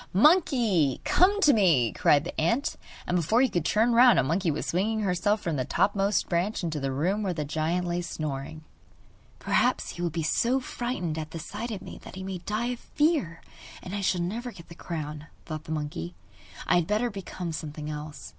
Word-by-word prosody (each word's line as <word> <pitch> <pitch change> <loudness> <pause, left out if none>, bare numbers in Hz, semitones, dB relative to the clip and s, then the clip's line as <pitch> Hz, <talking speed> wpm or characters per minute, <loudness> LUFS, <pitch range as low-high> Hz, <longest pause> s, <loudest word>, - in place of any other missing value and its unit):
'Monkey, 225 - +4
come 400 +3 +4
to 290 - +6
me!' 165 - +4
cried 145 -1 +4
the 170 - -4
ant; 230 - +1 0.3
and 180 - -1
before 180 +7 +2
you 265 - +2
could 175 - 0
turn 225 +8 +2
round 245 +1 +7
a - - +4
monkey 165 +6 0
was 150 - -2
swinging 215 +5 0
herself 205 +2 +1
from 165 -4 -1
the 130 - 0
topmost 200 +7 +1
branches 180 +4 -1
into 160 -3 -2
the 135 -1 -2
room 180 +10 0
where 190 -4 -1
the 150 -2 -2
giant 160 +4 -1
lay 175 0 -1
snoring. 155 -2 -5 0.7
'Perhaps - - +1
he 175 - -7
will 175 - 0
be 165 0 -3
so 240 - +2
frightened 240 -11 -3
at 155 0 -5
the 165 - -7
sight 210 +8 -5
of 210 -4 -5
me - - -9
that - - -11
he 190 - -6
may 190 -1 -4
die 215 +7 -2
of 240 - -9
fear, 295 - 0 0.4
and 185 - -7
I 205 - -2
shall 185 -2 +1
never 230 +8 -3
get 170 -6 -14
the - - -9
crown,' 155 -3 -6 0.2
thought 155 -1 -6
the - - -7
monkey. 145 - -4 0.5
'I - - +3
had 170 -2 +1
better 225 +3 +1
become 185 -3 -6
something 150 -1 -6
else. 150 0 -7
175 Hz, 205 wpm, -27 LUFS, 155-215 Hz, 0.7 s, round